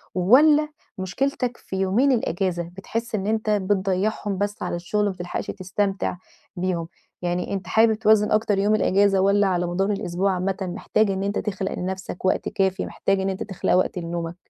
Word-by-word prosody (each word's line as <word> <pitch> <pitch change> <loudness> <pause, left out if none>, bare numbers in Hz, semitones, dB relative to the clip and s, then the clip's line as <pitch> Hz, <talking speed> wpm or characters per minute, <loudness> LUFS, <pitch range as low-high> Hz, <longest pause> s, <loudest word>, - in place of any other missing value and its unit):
والّا 295 - +5 0.3
مشكلتك 245 +6 -2
في - - -8
يومين 195 +9 +2
الأجازة؟ 185 -6 0
بتحس 230 +4 -3
إن 200 -1 -2
أنت 220 0 0
بتضيّعهم 200 0 0
بس 205 +1 -2
على - - -2
الشغل 205 +4 -1
ما 200 - +1
بتلحقش 175 -1 -5
تستمتع 195 0 -2 0.4
بيهم؟ 175 -2 -2 0.3
يعني 175 +1 -2
أنت 190 -2 -4
حابب 220 +3 +4
توازن 215 -1 +3
أكتر 215 -1 +2
يوم 205 +2 +3
الأجازة 200 -1 +3
والّا 200 +1 +3
على 180 -2 0
مدار 190 +4 0
الأسبوع 195 -1 0
عامةً 185 +1 -1
محتاج 195 +3 0
إن 190 0 -2
أنت 200 +1 -1
تخلق 195 -2 -3
لنفسك 190 0 -5
وقت 185 - +1
كافي، 195 -2 0
محتاج 195 0 -1
إن 190 0 0
أنت 190 0 -3
تخلق 195 -3 -1
وقت 185 0 +2
لنومك؟ 170 0 -4
195 Hz, 170 wpm, -23 LUFS, 185-210 Hz, 0.4 s, والّا